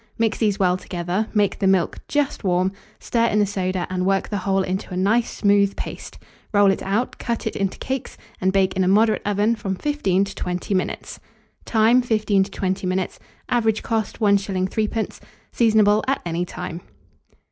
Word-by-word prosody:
Mix 225 -1 0
these 210 -3 +1
well 185 -3 +2
together; 180 +4 -3
make 205 -3 +1
the 195 - +2
milk 190 -3 +2
just 290 -3 -1
warm, 185 0 +1 0.3
stir 230 -1 +1
in 210 - +1
the 210 - +4
soda, 185 -2 -2
and 180 -1 -1
work 195 0 +1
the 205 - -2
whole 195 0 +1
into 190 +2 -3
a 180 - -3
nice 220 +5 +2
smooth 200 -1 +2
paste; - - -7 0.3
roll 205 -2 +5
it - - -2
out, 205 +6 -1
cut 235 -2 -3
it 220 - -2
into 195 -1 -1
cakes, 265 -1 -4 0.2
and 190 +1 +2
bake 190 -1 +2
in 190 - +2
a - - +1
moderate 215 +3 +3
oven 210 +3 +2
from 195 -3 -3
15 200 -8 +1
to 200 - -5
20 180 +2 -3
minutes. 185 -1 -3 0.5
Time. 225 +2 +4
15 215 -5 +2
to - - -11
20 190 -1 -2
minutes. 185 0 -2 0.3
Average 225 -3 +1
cost, 225 -2 -2
1s. 200 -3 +2
3d. 220 +2 -2 0.3
Seasonable 215 -2 +4
at 270 - +1
any 170 +1 -1
time. 180 -1 -6
200 Hz, 180 wpm, -22 LUFS, 185-220 Hz, 0.5 s, roll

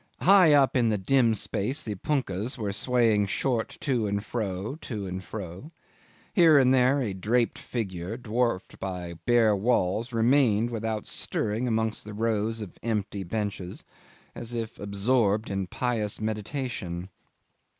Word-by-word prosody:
High 185 -4 +7
up 140 -2 +4
in 120 -3 +3
the 105 - +1
dim 115 +3 +3
space 110 +6 -2
the 110 - -3
punkahs 120 - -1
were 105 -4 -3
swaying 115 -3 +3
short 115 +2 -1
to 125 -7 0
and 100 +1 -2
fro, 105 +3 -3
to 105 -5 -5
and 95 0 -5
fro. 95 - -7 0.6
Here 165 -6 +6
and 130 -1 +5
there 130 +2 +4
a 105 -5 -2
draped 115 +5 0
figure, 95 -3 -4
dwarfed 115 -3 -2
by 90 -2 -4
the 85 -1 -10
bare 115 -3 +4
walls, 110 +1 0
remained 115 -1 +3
without 110 -2 -3
stirring 110 +3 -2
amongst 110 -1 -1
the 105 0 -8
rows 110 0 0
of 100 -5 -9
empty 105 -3 -2
benches, 100 -1 -4 0.5
as 120 +1 -6
if 115 -1 -4
absorbed 105 +1 +1
in 95 -1 -2
pious 110 0 -2
meditation. 110 -5 -4
110 Hz, 145 wpm, -27 LUFS, 100-125 Hz, 0.6 s, High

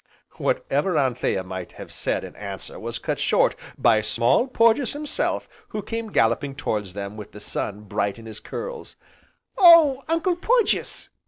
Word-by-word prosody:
Whatever - - 0
Anthea 125 -7 0
might 95 -1 -7
have - - -10
said - - -2
in - - -9
answer 100 -3 -7
was - - -4
cut - - -3
short - - +3 0.2
by 110 -3 +4
Small 115 - +2
Porges 230 0 +3
himself 295 0 -2 0.2
who 210 -1 -5
came 225 0 -5
galloping 135 +3 +1
towards 105 -8 -3
them 100 +1 -6
with 105 -1 -9
the 105 - -9
sun 105 0 -4
bright 100 0 -2
in 115 - -12
his 110 -1 -8
curls. 485 -1 -7 0.6
"Oh, 330 -7 +8
Uncle 330 +2 +1
Porges!" 460 +3 +1
135 Hz, 155 wpm, -24 LUFS, -, 0.6 s, Oh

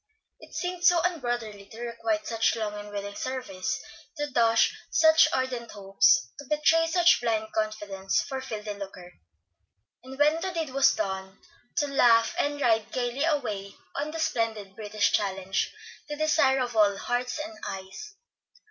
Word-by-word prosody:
It - - -14
seemed 355 0 -3
so 350 -1 +6
unbrotherly 240 - -3
to 225 - -10
requite 225 -2 -2
such 225 0 +1
long 215 -2 -3
and 210 0 -8
willing 205 0 -5
service, 250 -7 -3 0.4
to 295 - -1
dash 230 -2 +3
such 315 0 +6
ardent 255 -3 -2
hopes, 195 -5 +3
to 285 - -8
betray 310 +3 +3
such 345 -2 +4
blind 220 -2 -1
confidence, 210 -3 -1
for 265 -1 -5
filthy 215 -5 -5
lucre; 190 -3 -9 0.9
and 265 +1 -10
when 300 +3 +3
the 380 - -2
deed 325 -5 -3
was 275 +1 +4
done, 190 -2 -4 0.4
to 290 - +2
laugh, 230 -4 +4
and 290 0 0
ride 225 -5 +2
gayly 250 +3 -1
away 215 -11 -2 0.2
on 295 +2 -2
the 320 - -6
splendid 220 -9 -2
British 210 -1 0
Challenge, 195 -1 -1 0.4
the 295 - -3
desire 295 -3 +3
of 245 -2 -3
all 205 -2 +4
hearts 245 +4 -2
and 315 +2 -5
eyes. 195 - -8
235 Hz, 155 wpm, -27 LUFS, 205-290 Hz, 0.9 s, so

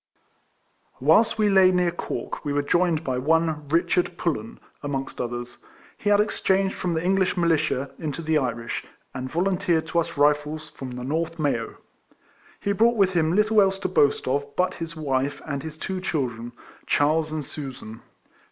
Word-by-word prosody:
Whilst 165 - +4
we 215 -1 +3
lay 190 -2 +6
near 180 -1 +2
Cork 175 - -5
we 145 - -2
were 145 0 +1
joined 170 +1 +2
by 130 -4 -1
one 155 +1 +1
Richard 170 +2 +1
Pullen, 115 -10 -3 0.2
amongst 140 -2 -4
others; 120 0 -5 0.4
he 205 - -2
had 205 0 +5
exchanged 195 -2 +1
from 175 -2 -2
the 160 - -1
English 190 0 +2
militia 155 -5 +1
in 155 -2 -3
,to 165 - -6
the 155 -1 +2
Irish, 120 -3 -3 0.3
and 130 0 -5
volunteered 175 -1 +1
to 170 - +2
us 165 - -3
Rifles 150 +1 +1
from 130 - -7
the 125 0 -6
North 160 +5 -2
Mayo. 140 -7 -1 0.8
He 200 - -1
brought 230 +4 +3
with 190 -2 +3
him 165 -1 +2
little 210 +1 +4
else 195 -1 +2
to 195 -1 -2
boast 145 -8 +2
of 140 +2 +1
but 180 +1 +1
his 165 0 -6
wife 140 -2 -1
and 140 -3 -3
his 155 +1 -8
two 185 +3 -4
children, 120 -9 -3 0.3
Charles 155 +2 +2
and 155 -2 -3
Susan. 130 -6 -8
160 Hz, 170 wpm, -25 LUFS, 140-180 Hz, 0.8 s, lay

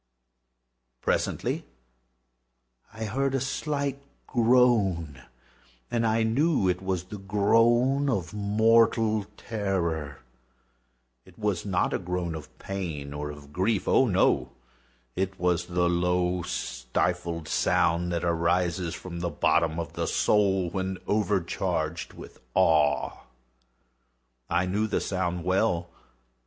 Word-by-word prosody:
Presently - - -1 1.3
I 110 0 -5
heard 135 +5 0
a - - +1
slight 140 +1 -2 0.2
groan, 110 - +2 0.7
and 115 -1 +1
I 110 +1 +2
knew 130 - +2
it 90 0 0
was 95 -2 -2
the 100 +3 -9
groan 120 +7 +3
of 95 -9 -2
mortal 110 0 +3
terror. 85 -9 -2 1.0
It 90 -2 -19
was 105 -3 -1
not 95 -2 +1
a - - 0
groan 90 -2 -3
of 80 -2 -9
pain 80 -8 -5
or 75 0 -4
of 75 -1 -11
grief—oh, 95 +2 +2
no!—it 65 +8 -2
was 90 -1 +1
the 90 0 +1
low 90 +1 +1
stifled 85 +5 -2
sound 85 +3 +1
that 85 -1 -1
arises 85 +1 0
from 85 -2 -7
the 85 0 -1
bottom 80 +1 +1
of 80 -3 -5
the - - -2
soul 95 -4 +2
when 95 0 -2
overcharged 105 -4 -1
with - - -12 0.2
awe. 75 -3 +2 1.2
I 85 +2 +2
knew 105 +4 0
the - - 0
sound 90 -2 -2
well. 90 -2 +1
90 Hz, 110 wpm, -27 LUFS, 85-110 Hz, 1.3 s, groan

